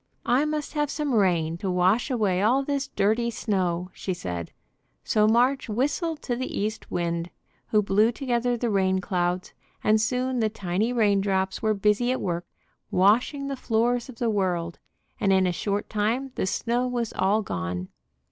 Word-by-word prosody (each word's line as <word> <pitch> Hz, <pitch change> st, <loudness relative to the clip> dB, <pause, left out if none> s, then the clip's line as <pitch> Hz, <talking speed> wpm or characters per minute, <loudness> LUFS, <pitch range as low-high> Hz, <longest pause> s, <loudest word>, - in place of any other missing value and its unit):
"I 255 Hz, +5 st, +3 dB
must 300 Hz, -1 st, -3 dB
have 295 Hz, -1 st, 0 dB
some 290 Hz, -2 st, -2 dB
rain 170 Hz, -6 st, +2 dB
to 195 Hz, -, -2 dB
wash 185 Hz, +8 st, +2 dB
away 205 Hz, -7 st, +1 dB
all 250 Hz, +6 st, +3 dB
this 280 Hz, 0 st, -2 dB
dirty 220 Hz, 0 st, +1 dB
snow," 185 Hz, -5 st, -1 dB
she 185 Hz, -, -4 dB
said; 90 Hz, -, -5 dB, 0.5 s
so 210 Hz, 0 st, +3 dB
March 245 Hz, +3 st, +2 dB
whistled 295 Hz, -, -1 dB
to 245 Hz, -, -1 dB
the 255 Hz, +2 st, -4 dB
East 215 Hz, +2 st, -3 dB
Wind, 170 Hz, 0 st, -2 dB, 0.4 s
who 210 Hz, -1 st, +3 dB
blew 210 Hz, +3 st, +3 dB
together 245 Hz, -1 st, -1 dB
the 235 Hz, -1 st, -1 dB
rain 190 Hz, -1 st, +2 dB
clouds, 180 Hz, -1 st, -1 dB, 0.3 s
and 215 Hz, 0 st, +4 dB
soon 250 Hz, +2 st, 0 dB
the 220 Hz, -1 st, +2 dB
tiny 200 Hz, +2 st, -1 dB
rain 210 Hz, -5 st, +3 dB
drops 190 Hz, -1 st, -1 dB
were 215 Hz, -1 st, +2 dB
busy 210 Hz, +5 st, +2 dB
at 260 Hz, -, -1 dB
work 175 Hz, -1 st, -3 dB, 0.4 s
washing 230 Hz, +9 st, +3 dB
the 275 Hz, -, -2 dB
floors 240 Hz, +1 st, 0 dB
of 255 Hz, -, -9 dB
the 235 Hz, -1 st, 0 dB
world, 175 Hz, -4 st, -1 dB, 0.4 s
and 195 Hz, -, +2 dB
in 190 Hz, -1 st, +4 dB
a 180 Hz, -, +2 dB
short 200 Hz, +4 st, -2 dB
time 230 Hz, +6 st, -1 dB
the 190 Hz, -, -2 dB
snow 240 Hz, +5 st, 0 dB
was 240 Hz, -3 st, -2 dB
all 200 Hz, +4 st, +2 dB
gone. 90 Hz, -, -4 dB
215 Hz, 175 wpm, -26 LUFS, 190-245 Hz, 0.5 s, and